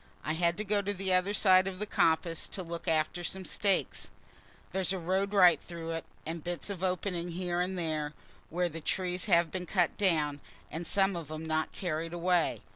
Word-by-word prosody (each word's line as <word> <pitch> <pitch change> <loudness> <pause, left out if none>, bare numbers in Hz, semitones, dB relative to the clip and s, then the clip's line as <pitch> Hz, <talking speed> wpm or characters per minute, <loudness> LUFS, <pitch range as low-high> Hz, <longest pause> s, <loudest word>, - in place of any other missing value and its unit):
I 155 - -1
had 170 +1 +1
to 210 - -2
go 205 0 +1
to 200 +1 -2
the 190 0 -1
other 185 +2 +2
side 190 -2 +5
of 190 -1 -4
the 210 - -2
coppice 165 -3 +1
to 190 - -5
look 170 -1 -6
after 160 +2 +1
some 190 +2 -4
stakes. 195 0 +1 0.6
There's 190 -1 0
a - - -1
road 190 +3 0
right 180 -6 +6
through 165 -1 -6
it, 165 0 -3 0.2
and 165 0 -5
bits 175 +3 -3
of 190 -2 -6
openings 180 -2 -1
here 175 -1 -1
and 185 +1 -1
there, 155 -3 -2 0.3
where 175 +2 +1
the 165 -1 -7
trees 180 +2 -1
have 170 -5 +4
been 180 -1 -4
cut 175 -3 +1
down, 150 -7 +2 0.3
and 165 +1 -4
some 195 -1 +3
of 165 -3 -5
'em 155 +1 -5
not 155 0 0
carried 165 -2 -3
away. 175 - +1
175 Hz, 200 wpm, -31 LUFS, 165-190 Hz, 0.6 s, right